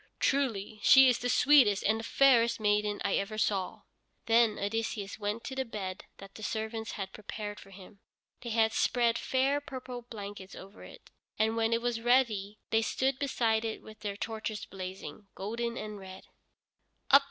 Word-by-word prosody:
"Truly 225 -7 0
she 265 +3 +8
is 245 - +1
the 245 - -2
sweetest 245 -6 +5
and 220 +2 +2
the - - -6
fairest 235 -2 +4
maiden 210 -1 +1
I - - +2
ever 215 +2 -3
saw." 195 -3 -1 0.4
Then 230 -1 +4
Odysseus 205 -1 -3
went 210 +2 -3
to 265 - -6
the 265 - 0
bed 195 -6 -6
that 195 0 -12
the - - -11
servants 220 +1 -4
had 190 -2 -6
prepared 210 0 -7
for 195 - -14
him. 195 +1 -14 0.4
They 240 - -6
had 220 0 +2
spread 235 -1 +2
fair 270 +2 +1
purple 255 -3 -7
blankets 205 -5 -9
over 195 +3 -12
it, - - -14 0.3
and 220 +1 +1
when 225 0 +1
it 230 0 +1
was 240 -2 -1
ready 225 -5 +2
they 225 - +3
stood 260 +4 0
beside 230 -6 +1
it 225 -1 -4
with 215 0 -13
their 200 -1 -5
torches 220 -1 -4
blazing, 190 +2 -8
golden 235 +4 -3
and 210 -1 -6
red. 190 0 -10
220 Hz, 170 wpm, -30 LUFS, 205-235 Hz, 0.4 s, she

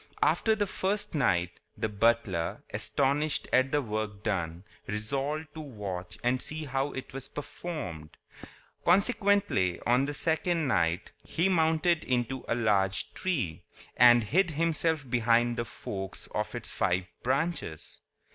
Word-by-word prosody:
After 220 -1 +3
the 210 -1 0
first 205 +2 -2
night, 90 - +1 0.2
the - - 0
butler, 105 -5 +1
astonished 145 +2 0
at 130 +1 +4
the 145 -1 +1
work 105 -2 -4
done, 90 -5 -2 0.2
resolved 140 +9 -3
to 160 - -8
watch 95 - -6
and 125 +1 +1
see 155 0 -3
how 135 +1 -1
it 130 - -7
was 135 0 -5
performed. 140 - -6 0.7
Consequently, 200 - +3
on 125 +3 +3
the 145 +1 -3
second 165 +1 +1
night, 85 -7 +1
he 175 +4 +1
mounted 160 -1 +2
into 125 +1 -1
a - - +1
large 100 -5 +1
tree, 130 - -2 0.3
and 120 -1 +7
hid 175 - +2
himself 160 -2 0
between 120 0 +3
the 120 0 -2
forks 95 -3 -5
of 105 +2 -2
its 120 -3 -2
five 90 0 +1 0.2
branches. 140 - -2
130 Hz, 135 wpm, -29 LUFS, 105-160 Hz, 0.7 s, and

